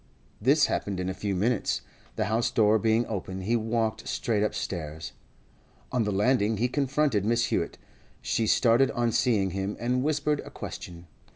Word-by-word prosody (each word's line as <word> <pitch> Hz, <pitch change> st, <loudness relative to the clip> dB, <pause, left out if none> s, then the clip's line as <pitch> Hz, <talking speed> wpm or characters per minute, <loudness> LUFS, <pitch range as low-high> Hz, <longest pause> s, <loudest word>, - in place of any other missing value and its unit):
This 140 Hz, +5 st, +4 dB
happened 100 Hz, -7 st, -2 dB
in 90 Hz, 0 st, -2 dB
a -, -, -2 dB
few 100 Hz, +1 st, -3 dB
minutes. 110 Hz, +4 st, 0 dB, 0.3 s
The -, -, 0 dB
house 110 Hz, +3 st, +1 dB
door 110 Hz, 0 st, +3 dB
being 115 Hz, +2 st, +2 dB
open, 95 Hz, -3 st, -5 dB
he 110 Hz, +6 st, 0 dB
walked 110 Hz, -1 st, -1 dB
straight 110 Hz, -3 st, 0 dB
upstairs. 80 Hz, -7 st, -3 dB, 0.8 s
On 120 Hz, -3 st, +1 dB
the 105 Hz, -, 0 dB
landing 105 Hz, +1 st, +2 dB
he 120 Hz, +4 st, +1 dB
confronted 135 Hz, -5 st, +1 dB
Mrs. 115 Hz, +2 st, +2 dB
Hewett; -, -, -1 dB, 0.4 s
she 115 Hz, -, -1 dB
started 120 Hz, +4 st, +4 dB
on 120 Hz, -1 st, +1 dB
seeing 110 Hz, -6 st, +2 dB
him, 95 Hz, +2 st, -3 dB
and 125 Hz, +2 st, 0 dB
whispered 150 Hz, 0 st, 0 dB
a -, -, -8 dB
question. 85 Hz, 0 st, -8 dB
110 Hz, 165 wpm, -27 LUFS, 100-125 Hz, 0.8 s, This